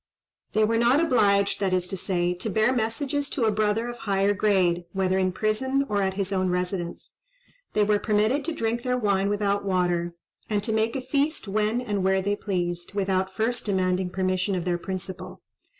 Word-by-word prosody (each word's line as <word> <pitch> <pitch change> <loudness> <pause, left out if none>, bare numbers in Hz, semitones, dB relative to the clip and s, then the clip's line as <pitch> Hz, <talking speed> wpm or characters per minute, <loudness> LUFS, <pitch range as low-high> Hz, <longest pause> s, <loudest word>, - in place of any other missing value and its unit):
They 215 - +3
were 225 +1 +2
not 240 +5 +4
obliged, 205 -11 +3
that 190 -2 0
is 180 -1 +1
to - - -2
say, 175 -1 0
to 180 +5 -4
bear 220 +5 +2
messages 275 +5 -1
to 250 -7 0
a 220 - +3
brother 215 +2 0
of 240 0 -6
higher 200 0 +1
grade, 185 -4 +2
whether 190 -1 +1
in 185 -1 +1
prison 260 +8 0
or 205 -1 0
at 190 -1 0
his 195 0 -2
own 185 -1 +1
residence. 180 -1 -3 0.6
They 210 - +3
were 205 0 +2
permitted 215 +7 +1
to 335 - -1
drink 235 -5 -1
their 250 0 0
wine 200 -4 +1
without 205 -1 0
water, 175 -3 0 0.3
and 205 -2 0
to 220 - -1
make 220 +2 +1
a 265 - -2
feast 280 +1 -1
when 215 +4 0
and 205 -6 -2
where 190 0 +3
they 205 +1 0
pleased, 175 -2 -3
without 190 -1 0
first 230 +1 -1
demanding 185 -2 +1
permission 185 +1 0
of 180 -1 -3
their 175 -1 0
principal. 185 0 -6
200 Hz, 195 wpm, -25 LUFS, 185-225 Hz, 0.6 s, not